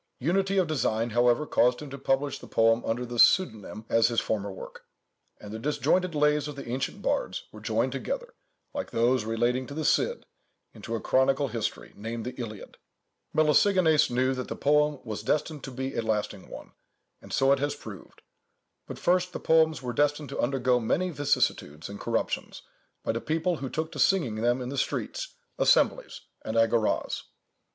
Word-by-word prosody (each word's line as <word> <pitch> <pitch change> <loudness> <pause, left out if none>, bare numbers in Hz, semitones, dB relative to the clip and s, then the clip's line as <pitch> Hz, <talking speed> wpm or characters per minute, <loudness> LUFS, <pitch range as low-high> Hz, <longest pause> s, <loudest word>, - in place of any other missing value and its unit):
Unity 190 +7 +1
of 185 - +4
design, 120 -7 0
however, 120 +5 +3
caused 125 -3 +2
him 150 -2 -9
to 140 - -6
publish 135 +1 0
the - - -12
poem 115 +1 +3
under 120 +2 -1
the 120 -1 -5
same 185 +9 +7 0.2
pseudonyme 105 +2 -9
as 115 -1 +4
his 120 -2 +1
former 100 -2 -2
work: 95 - -10 0.6
and 105 - -10
the 110 - -5
disjointed 165 +6 +1
lays 150 0 +2
of 150 - -6
the 140 - -8
ancient 125 +3 -3
bards - - -1
were - - -12
joined - - 0
together, - - -4 0.4
like 285 -1 -4
those 120 0 +2
relating 120 +3 0
to 140 - -8
the 155 -1 -3
Cid, - - +1 0.5
into 115 0 -5
a - - -2
chronicle 135 +3 +2
history, 110 -1 -4
named 115 +2 -5
the 125 - -4
Iliad. 110 -3 -8 0.6
Melesigenes 160 +1 +4
knew 130 +2 +1
that 130 -1 -4
the - - -4
poem 150 0 +2
was 110 -4 -5
destined 150 0 -1
to 135 - -7
be 130 +2 -4
a - - 0
lasting 105 -3 -2
one, - - -10 0.5
and - - -13
so 135 0 +3
it 140 - +4
has 145 +1 -1
proved; 110 - -12 0.6
but, - - -7
first, 180 0 +1
the - - -4
poems 160 -3 +3
were 125 -1 -3
destined 145 +2 +1
to 140 - -6
undergo 125 -1 +2
many 175 +11 0
vicissitudes 90 - 0
and 100 0 -8
corruptions, 115 -1 -2 0.4
by - - 0
the 115 +1 -3
people 165 +2 0
who 135 -2 -5
took 160 +3 -3
to - - -8
singing 170 - +3
them 120 +3 +1
in 125 - -5
the 140 0 -2
streets, - - -3 0.2
assemblies, - - +2 0.2
and 110 - -3
agoras. 115 -1 +1
130 Hz, 185 wpm, -27 LUFS, 115-150 Hz, 0.6 s, same